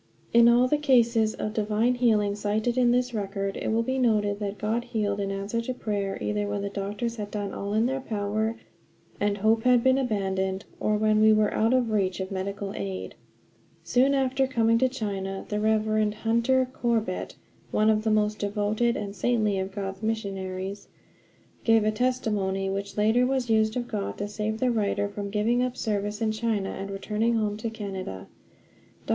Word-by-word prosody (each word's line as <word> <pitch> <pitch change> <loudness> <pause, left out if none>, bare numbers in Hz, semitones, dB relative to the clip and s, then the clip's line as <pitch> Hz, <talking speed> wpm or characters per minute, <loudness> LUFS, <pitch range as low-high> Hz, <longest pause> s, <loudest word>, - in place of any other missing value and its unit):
In 235 0 +7
all 245 +2 +5
the 295 +3 +1
cases 235 -6 +3
of 210 - -3
divine 220 +3 +1
healing 220 -5 +2
cited 215 +3 -1
in 250 -2 +3
this 250 0 +1
record 195 -2 -3
it - - -4
will 225 +1 +2
be 260 +3 -1
noted 210 -4 +2
that 205 -1 -4
God 225 +3 -1
healed 210 -4 -1
in 200 -1 -1
answer 200 +4 -2
to 250 +2 -4
prayer 200 -4 -2
either 210 0 -1
when 205 0 -2
the 200 - -3
doctors 210 +4 -3
had 205 -1 -5
done 205 -1 -4
all 200 +1 -3
in 220 +2 +3
their 265 +2 0
power 215 0 -2 0.6
and 205 0 +1
hope 220 +2 +3
had 245 0 +4
been 260 +1 +4
abandoned, 190 -5 -1
or 210 0 +1
when 215 0 +3
we 220 0 +7
were 215 -1 +3
out 225 +2 +2
of 250 -3 +2
reach 195 -3 0
of 190 +1 -4
medical 195 +1 -4
aid. 95 -2 -5 0.7
Soon 265 +3 +3
after 265 0 +1
coming 230 -3 +2
to 260 +1 +3
China 195 -6 -4
the 210 - -1
Rev. 215 0 +2
Hunter 235 +4 +2
Corbett, 225 -7 -1 0.3
one 215 +1 +3
of 215 0 +1
the 220 - +1
most 210 0 +1
devoted 210 +3 0
and 200 -1 -5
saintly 210 -1 +1
of 190 +1 -3
God's 195 -1 -5
missionaries, 195 -3 -4 0.8
gave 225 -1 +4
a 215 - +2
testimony 210 -5 0
which 200 +1 -4
later 220 +4 +3
was 260 -3 0
used 220 +1 +2
of 240 -1 -3
God 205 -3 -4
to 205 - -3
save 210 +1 -3
the 255 0 +2
writer 205 -2 0
from 200 0 -5
giving 220 +4 +1
up 250 0 -2
service 210 0 -2
in 220 - +1
China 215 -3 -1
and 195 +1 -5
returning 210 +4 -1
home 210 -2 0
to 225 +1 -3
Canada. 190 - -6 0.8
Dr. - - -14
215 Hz, 185 wpm, -26 LUFS, 200-235 Hz, 0.8 s, In